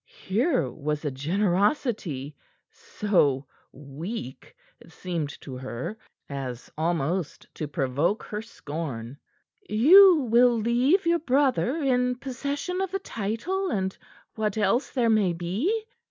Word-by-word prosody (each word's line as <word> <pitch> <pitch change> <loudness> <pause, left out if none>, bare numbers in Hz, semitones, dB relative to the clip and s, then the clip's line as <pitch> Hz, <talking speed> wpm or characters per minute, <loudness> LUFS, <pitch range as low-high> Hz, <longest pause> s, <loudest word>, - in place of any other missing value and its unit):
Here 235 - +1
was 150 0 -4
a 145 - 0
generosity 175 - 0 0.4
so 145 -10 0 0.3
weak, 145 - -8 0.2
it - - -17
seemed 165 -5 -4
to 130 -3 -7
her, 130 - -5 0.3
as 130 -3 -6
almost 165 +1 -1
to 150 - -4
provoke 140 - 0
her 210 0 -5
scorn. 145 - -6 0.5
"You 320 - +7
will 240 +1 +5
leave 245 - +2
your 340 0 +3
brother 270 -2 +2
in 250 -2 +2
possession 280 +8 -3
of 385 - -1
the 385 - -1
title 360 - -3
and 190 - -1 0.4
what 215 -1 -2
else 215 +6 +1
there 245 -3 +1
may 205 -5 +3
be?" 225 - -1
205 Hz, 120 wpm, -26 LUFS, -, 0.5 s, You